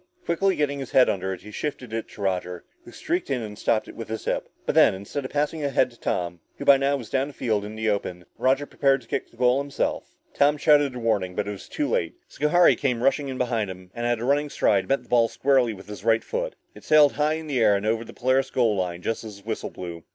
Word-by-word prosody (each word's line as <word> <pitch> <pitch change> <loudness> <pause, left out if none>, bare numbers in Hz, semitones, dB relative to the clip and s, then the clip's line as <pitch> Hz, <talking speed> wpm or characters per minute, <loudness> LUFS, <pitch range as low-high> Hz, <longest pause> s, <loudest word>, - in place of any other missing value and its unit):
Quickly 190 +3 +1
getting 140 -1 -1
his 135 - -6
head 130 - +6
under 95 -1 -1
it, 95 - -6
he 105 - -11
shifted 125 -2 -5
it 115 0 -3
to - - -12
Roger, 90 -2 -2 0.2
who 355 - -12
streaked 350 +2 -3
in 125 -4 -1
and 105 -1 -7
stopped 110 +1 0
it - - -11
with 115 - -7
his 110 0 -5
hip. - - -2 0.2
But - - 0
then, - - +5
instead 100 +9 -5
of - - -4
passing 150 +1 -1
ahead 140 -2 +2
to 120 - -20
Tom, 90 0 -2 0.2
who 140 - -6
by 140 -1 +8
now 140 +1 +1
was 120 -5 -10
down 135 +2 0
field 110 -5 -1
and 105 +1 -7
in 110 - -3
the 110 - +3
open, 90 -3 -4
Roger 135 +2 +2
prepared 135 -2 +1
to - - -22
kick - - -2
for - - -30
the - - -20
goal 125 +2 +3
himself. 140 0 -3 0.2
Tom 145 +1 +3
shouted 145 -3 +4
a - - -4
warning 105 -6 0
but 105 0 -2
it - - -2
was 100 -2 -9
too 295 - -1
late. - - -1
Schohari 170 +4 +4
came 125 -4 -1
rushing 140 +1 +2
in 130 -1 -5
behind 115 -5 -1
him, 90 -1 -10
and 120 0 -2
at 120 -1 +1
running 140 +5 +1
stride, 100 -7 +1
met 135 -2 +1
the - - -23
ball 120 -1 +4
squarely 130 -1 +2
with 95 -2 -10
his 105 -1 -9
right 115 0 +3
foot. - - -3 0.2
It - - -14
sailed 150 -2 +6
high 150 +1 +1
in 160 0 -5
the 140 -4 -1
air 105 -3 +5
and 100 +1 -2
over 110 +1 0
the - - -11
Polaris 130 +2 +1
goal 115 -6 +2
line 90 -2 -3
just 115 - -2
as 105 -2 -9
the 100 - -17
whistle 110 - -3
blew. 85 -2 -8
120 Hz, 270 wpm, -25 LUFS, 105-140 Hz, 0.2 s, by